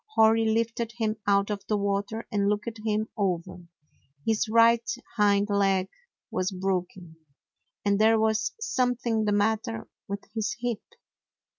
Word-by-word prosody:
Hori 225 0 +5
lifted 230 +1 -1
him 220 -2 -1
out 200 +1 +3
of 205 -1 -4
the 210 - +1
water 200 +2 -2
and 200 -2 +1
looked 215 +2 -2
him 215 0 0
over. 180 -4 -2 0.6
His 220 0 +1
right 230 +1 +5 0.3
hind 205 -1 +3
leg 195 -2 +2 0.4
was 185 0 0
broken, 185 -3 -3 0.7
and 200 0 +2
there 220 0 +5
was 220 +1 +1
something 245 - 0
the 210 - +1
matter 205 - 0 0.2
with 200 0 -4
his 215 -3 -2
hip. 240 -3 -2
210 Hz, 135 wpm, -27 LUFS, 200-225 Hz, 0.7 s, Hori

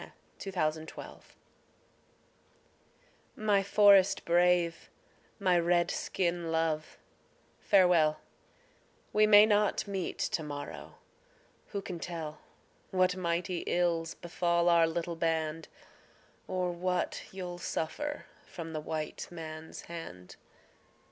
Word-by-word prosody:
A - - -11 0.3
CRY 195 - -5
FROM 185 - -2
AN 155 0 +1
INDIAN 160 - -11
WIFE - - -11 2.0
My 210 -2 +2
forest 200 -1 +5
brave, 175 0 +2 0.5
my 185 -4 +3
Red 175 0 +2
skin 170 -2 -2
love, 160 -1 -1 0.6
farewell; 170 -6 +4 0.9
We 215 0 +5
may 210 0 +9
not 210 -1 +2
meet 195 -3 -3
to 165 - -1
morrow; 145 -2 -7 0.7
who 200 -2 -5
can 180 -3 -6
tell 160 -3 -6 0.5
What 185 -1 +2
mighty 175 0 -1
ills 170 -2 0
befall 170 0 +1
our 170 -1 +5
little 170 +1 -3
band, 165 -1 -1 0.8
Or 185 -1 -1
what 180 +1 -2
you'll 180 -2 -6
suffer 295 - -3 0.2
from 165 -1 -7
the 155 - -3
white 155 0 -4
man's 160 -2 -8
hand? 90 - -9
175 Hz, 110 wpm, -31 LUFS, 160-185 Hz, 2.0 s, may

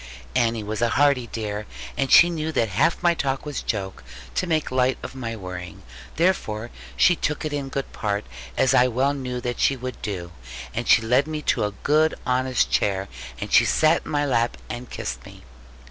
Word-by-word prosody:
Annie 115 -2 +1
was 105 +2 -4
a 120 - +3
hearty 140 -2 +3
dear, 105 -2 -4 0.3
and 135 - -1
she 175 0 +8
knew 160 -1 -2
that 115 -6 +1
half 100 - +1
my 175 -1 +5
talk 135 -4 -2
was 145 -1 -4
joke, 95 -4 -4 0.3
to 185 - -1
make 155 -5 0
light 130 0 +2
of 125 - -6
my 115 -3 -5
worrying. 90 -4 -8 0.3
Therefore 120 - 0 0.3
she 175 - +5
took 150 -1 -2
it 155 - -3
in 140 -2 -3
good 135 +1 -4
part, 105 -1 -2 0.3
as 130 - +3
I 125 - +5
well 130 +4 +1
knew 125 -3 -4
that 120 0 -3
she 135 - +3
would 130 0 -7
do; 90 -5 -4 0.4
and - - -3
she - - +6
led 125 +6 +3
me 155 -1 -4
to - - +1
a 105 - -2
good 155 +2 +3
honest 130 0 +1
chair; 95 -1 +1 0.3
and - - -5
she - - +7
sat 155 +2 +3
in - - -9
my 145 -1 +1
lap 120 -4 +1
and 120 0 -7
kissed - - -5
me. - - -13
125 Hz, 200 wpm, -24 LUFS, 110-145 Hz, 0.4 s, she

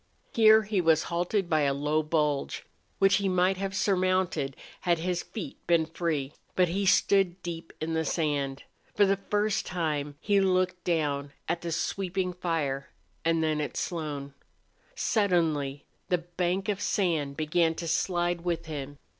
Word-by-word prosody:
Here 220 -1 +7
he 210 -3 0
was 160 -2 +4
halted 180 +3 0
by 155 -2 +2
a 140 -1 +2
low 150 +2 +1
bulge, 150 -2 -1 0.3
which 195 0 +5
he 200 -1 0
might 185 +1 +2
have 195 0 -3
surmounted 185 -7 +1 0.2
had 175 -2 +2
his 175 +1 -1
feet 215 - -7
been 170 -2 +4
free. 160 -4 -2 0.2
But 180 -2 +3
he 195 +3 0
stood 190 -1 +3
deep 165 -1 -6
in 160 +1 -2
the 160 0 +1
sand. 145 -4 -1 0.3
For 205 - +5
the 195 0 +1
first 210 0 +1
time 150 -5 -2
he 200 -1 +2
looked 185 -1 +1
down 145 -4 -1
at 170 - -1
the 170 - -4
sweeping 180 +2 -1
fire, 160 -6 -2 0.3
and 165 0 +2
then 155 -1 +1
at 150 - -4
Slone. 145 -5 -3 0.6
Suddenly 160 - +1 0.2
the 180 - +3
bank 175 +2 -2
of 205 -1 -1
sand 160 -10 0
began 160 +1 +2
to 170 - -5
slide 175 +1 0
with 170 -1 -2
him. 145 -2 -6
170 Hz, 155 wpm, -28 LUFS, 155-185 Hz, 0.6 s, Here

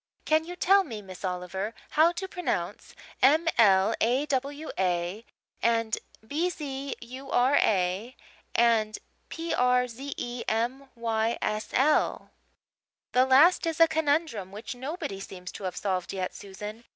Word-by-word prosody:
"Can 315 +1 +3
you 355 +1 -7
tell 390 +2 +4
me, 220 - -7
Miss 185 -1 -11
Oliver, 185 +3 -3 0.2
how 320 +3 +5
to 380 +2 -4
pronounce 360 -2 -3 0.3
M 310 +6 +5
l 200 -1 +5
a 250 +6 +2
w 285 +2 -2
a 180 +3 -1 0.4
and 230 -1 +1 0.3
B 315 +9 0
z 280 -4 -5
u 260 +3 -9
r 255 +3 +3
a 195 +5 +1 0.4
and 225 -2 +3 0.3
P 330 0 -3
r 250 0 +3
z 265 +4 -7
e 240 0 -4
m 245 +5 -1
y 230 -1 0
s 215 0 -2
l?" 295 +4 +2 0.8
"That 255 +1 +3
last 320 +7 +6
is 325 0 -2
a 330 - +8
conundrum 300 - 0
which 210 +4 -6
nobody 260 - -5
seems 185 -2 -8
to 200 - -8
have 185 - -3
solved 185 -2 -2
yet, 185 -1 -3
Susan. 210 +3 -8
240 Hz, 150 wpm, -28 LUFS, 210-290 Hz, 0.8 s, a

